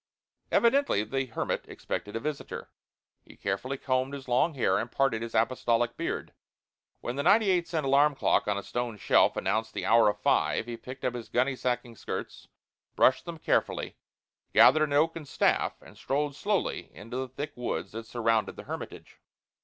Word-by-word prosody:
Evidently 235 Hz, -, +3 dB
the 135 Hz, +3 st, -2 dB
hermit 115 Hz, -, -2 dB
expected 105 Hz, -, -5 dB
a -, -, -1 dB
visitor. 150 Hz, +3 st, -5 dB, 0.5 s
He -, -, -17 dB
carefully 115 Hz, +8 st, -2 dB
combed 130 Hz, +1 st, -1 dB
his 135 Hz, -2 st, -9 dB
long 130 Hz, +6 st, +2 dB
hair 95 Hz, -7 st, +2 dB
and 120 Hz, -, -4 dB
parted 135 Hz, -5 st, +1 dB
his 115 Hz, 0 st, -5 dB
apostolic 115 Hz, 0 st, +1 dB
beard. -, -, -4 dB, 0.7 s
When 120 Hz, +2 st, -4 dB
the -, -, +1 dB
ninety 200 Hz, +5 st, +5 dB
eight 175 Hz, -2 st, +1 dB
cent 160 Hz, -4 st, -2 dB
alarm 140 Hz, +2 st, +4 dB
clock -, -, +2 dB
on 105 Hz, -1 st, +1 dB
a 100 Hz, -, -4 dB
stone 120 Hz, -3 st, -3 dB
shelf -, -, +3 dB
announced 110 Hz, 0 st, -1 dB
the -, -, -3 dB
hour 115 Hz, -2 st, +5 dB
of 105 Hz, -, -3 dB
five -, -, +2 dB
he 120 Hz, 0 st, -5 dB
picked 130 Hz, +3 st, -9 dB
up 125 Hz, -, 0 dB
his 120 Hz, -2 st, -7 dB
gunny 130 Hz, +2 st, +1 dB
sacking 125 Hz, -2 st, -2 dB
skirts, -, -, -6 dB, 0.5 s
brushed 130 Hz, -, +4 dB
them 170 Hz, -1 st, -6 dB
carefully, -, -, 0 dB, 0.6 s
gathered 155 Hz, 0 st, +7 dB
an 145 Hz, -, -4 dB
oaken 160 Hz, +2 st, +2 dB
staff, -, -, +1 dB
and -, -, -15 dB
strolled 145 Hz, +1 st, -1 dB
slowly 205 Hz, +5 st, -1 dB
into 115 Hz, +9 st, -7 dB
the 130 Hz, 0 st, -2 dB
thick 145 Hz, +4 st, -5 dB
woods 125 Hz, -1 st, -3 dB
that 115 Hz, +1 st, -7 dB
surrounded 115 Hz, -2 st, 0 dB
the -, -, -9 dB
hermitage. -, -, -8 dB
130 Hz, 175 wpm, -28 LUFS, 115-145 Hz, 0.7 s, gathered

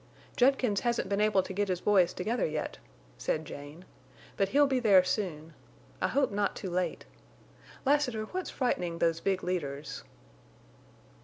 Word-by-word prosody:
"Judkins 250 Hz, -5 st, +3 dB
hasn't 240 Hz, -1 st, -1 dB
been 200 Hz, +1 st, +1 dB
able 210 Hz, -3 st, +3 dB
to 190 Hz, -, -7 dB
get 205 Hz, +1 st, 0 dB
his 185 Hz, -2 st, -1 dB
boys 185 Hz, -3 st, +4 dB
together 225 Hz, +8 st, -1 dB
yet," 155 Hz, 0 st, -4 dB, 0.4 s
said 160 Hz, 0 st, -1 dB
Jane. 145 Hz, +5 st, -10 dB, 0.5 s
"But 195 Hz, -1 st, +1 dB
he'll 290 Hz, +5 st, +5 dB
be 265 Hz, -2 st, +1 dB
there 200 Hz, -6 st, +6 dB
soon. 175 Hz, -5 st, -3 dB, 0.5 s
I -, -, +3 dB
hope 275 Hz, -4 st, +1 dB
not 200 Hz, 0 st, 0 dB
too 190 Hz, -, -5 dB
late. 180 Hz, +1 st, -2 dB, 0.8 s
Lassiter, 265 Hz, -6 st, +2 dB
what's 370 Hz, +10 st, -4 dB
frightening 180 Hz, -10 st, -1 dB
those 165 Hz, -1 st, +1 dB
big 190 Hz, 0 st, -1 dB
leaders?" 145 Hz, -5 st, -3 dB
195 Hz, 150 wpm, -30 LUFS, 170-235 Hz, 0.8 s, there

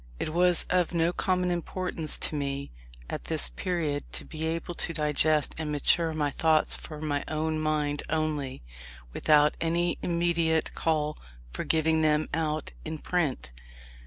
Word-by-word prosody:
It -, -, -2 dB
was 180 Hz, 0 st, +4 dB
of 180 Hz, -1 st, +2 dB
no 170 Hz, +1 st, +2 dB
common 180 Hz, -1 st, 0 dB
importance 175 Hz, -2 st, -1 dB
to 155 Hz, -, +1 dB
me, 140 Hz, -1 st, -3 dB, 0.4 s
at -, -, -5 dB
this -, -, -1 dB
period, 150 Hz, -, -2 dB
to -, -, -2 dB
be 160 Hz, 0 st, -4 dB
able 165 Hz, +1 st, -3 dB
to 165 Hz, -, -1 dB
digest 150 Hz, -1 st, +2 dB
and 155 Hz, -2 st, -2 dB
mature 160 Hz, +3 st, +3 dB
my 150 Hz, -2 st, -1 dB
thoughts 155 Hz, +1 st, +4 dB
for 155 Hz, -2 st, -7 dB
my 145 Hz, -2 st, -1 dB
own 155 Hz, 0 st, -1 dB
mind 150 Hz, -2 st, 0 dB
only, 150 Hz, -, -2 dB, 0.5 s
without 150 Hz, -1 st, +4 dB
any 170 Hz, +1 st, +1 dB
immediate 170 Hz, -2 st, +1 dB
call 150 Hz, -2 st, 0 dB, 0.3 s
for -, -, -3 dB
giving 160 Hz, 0 st, +2 dB
them 155 Hz, 0 st, +2 dB
out 155 Hz, -1 st, -1 dB
in 160 Hz, 0 st, -4 dB
print. 155 Hz, -, -1 dB
155 Hz, 150 wpm, -28 LUFS, 150-165 Hz, 0.5 s, was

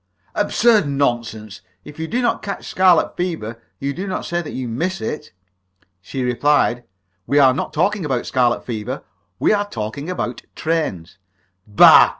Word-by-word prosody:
"Absurd 210 Hz, -3 st, +3 dB
nonsense! 120 Hz, -7 st, -2 dB, 0.2 s
If 150 Hz, -, -11 dB
you 160 Hz, -, -3 dB
do 245 Hz, +6 st, -1 dB
not -, -, +1 dB
catch 200 Hz, -, -5 dB
scarlet 185 Hz, -2 st, +3 dB
fever, 140 Hz, -11 st, -4 dB, 0.2 s
you 140 Hz, +1 st, -3 dB
do 190 Hz, +5 st, -5 dB
not 190 Hz, -, -3 dB
say 175 Hz, 0 st, -1 dB
that 155 Hz, -, -8 dB
you 130 Hz, -1 st, -4 dB
miss 175 Hz, +11 st, -2 dB
it!" 150 Hz, 0 st, -5 dB, 0.7 s
She 130 Hz, +7 st, -4 dB
replied: 125 Hz, -1 st, +2 dB, 0.4 s
"We 145 Hz, -, +2 dB
are 135 Hz, -3 st, +6 dB
not 135 Hz, -, -3 dB
talking 195 Hz, +4 st, +1 dB
about 130 Hz, -5 st, -1 dB
scarlet 125 Hz, -3 st, +1 dB
fever; 110 Hz, -4 st, -4 dB, 0.3 s
we -, -, +3 dB
are 205 Hz, 0 st, 0 dB
talking 115 Hz, -, -5 dB
about 125 Hz, -9 st, -3 dB
trains!" 150 Hz, -, -2 dB, 0.5 s
"Bah!" 105 Hz, -1 st, +8 dB
145 Hz, 160 wpm, -20 LUFS, 120-180 Hz, 0.7 s, Bah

